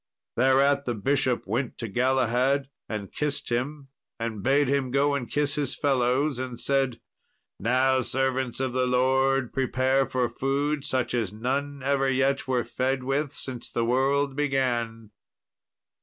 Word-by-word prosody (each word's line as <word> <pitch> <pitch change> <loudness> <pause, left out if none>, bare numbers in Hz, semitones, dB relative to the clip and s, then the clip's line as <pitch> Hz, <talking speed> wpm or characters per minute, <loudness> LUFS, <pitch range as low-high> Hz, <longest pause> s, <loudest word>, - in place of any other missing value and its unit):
Thereat 135 +3 +3
the 120 - -1
bishop 130 +3 0
went 120 +5 -2
to 115 - -4
Galahad 130 +3 +1 0.2
and 105 -3 -5
kissed 150 -1 -2
him, 135 +4 -2 0.3
and 115 -3 -3
bade 140 +5 +3
him 135 -1 0
go 140 +2 +2
and 135 -4 -3
kiss 145 -1 +1
his 145 -3 -1
fellows; 135 0 +1
and 125 -2 -5
said, 135 -3 0 0.6
"Now, 130 +4 +2
servants 130 -1 -1
of 130 -2 -1
the 130 0 +1
Lord, 130 0 +2
prepare 130 0 +1
for 130 -2 0
food 140 +4 -1
such 130 -1 0
as 115 -6 0
none 135 +5 -3
ever 135 0 +1
yet 135 +1 +1
were 125 -2 +1
fed 130 0 -1
with 135 +2 -1
since 130 -3 -5
the 115 - -1
world 135 +3 +1
began." 120 -6 -1
130 Hz, 145 wpm, -26 LUFS, 125-140 Hz, 0.6 s, Thereat